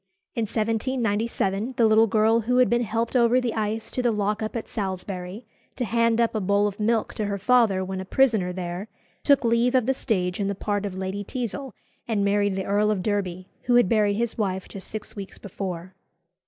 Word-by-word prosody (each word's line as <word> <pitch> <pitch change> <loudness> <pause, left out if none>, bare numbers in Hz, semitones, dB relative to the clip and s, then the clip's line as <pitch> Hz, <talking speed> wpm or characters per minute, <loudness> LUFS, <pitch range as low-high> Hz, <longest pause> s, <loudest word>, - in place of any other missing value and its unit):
In 230 -4 -1
1797 225 -1 -1
the 230 - +5
little 220 +1 +5
girl 220 +1 +3
who 245 +3 0
had 250 -1 +4
been 240 0 +3
helped 230 +2 -2
over 240 0 +4
the 245 -2 -1
ice 220 0 -2
to 255 - -1
the 240 -1 +2
lock 210 0 -1
up 215 +2 -4
at 230 - -4
Salisbury, 190 +1 -5 0.3
to 250 - -2
hand 230 0 +2
up 230 -1 +2
a 220 - 0
bowl 200 +2 +2
of 205 0 -3
milk 225 +1 +1
to 215 - -2
her 200 0 -2
father 205 -3 +3
when 190 0 -4
a - - -7
prisoner 220 -6 +2
there, 180 +2 -5 0.3
took 280 -2 +4
leave 235 +2 +3
of 255 -3 +3
the 265 - +2
stage 185 -8 -1
in 200 - 0
the 200 - -1
part 205 +1 -2
of 190 - -7
Lady 190 +2 -3
Teazle, 250 +4 -4 0.4
and 210 -3 +1
married 205 -1 +2
the 190 0 -3
Earl 205 +1 +2
of 200 -4 0
Derby, 185 -3 -2 0.2
who 245 - +3
had 245 -5 +5
buried 210 -1 +2
his 235 +1 -2
wife 190 -3 -1
just 195 - -9
six 215 - -7
weeks 200 -2 -8
before. 185 -2 -6
215 Hz, 210 wpm, -25 LUFS, 195-230 Hz, 0.4 s, the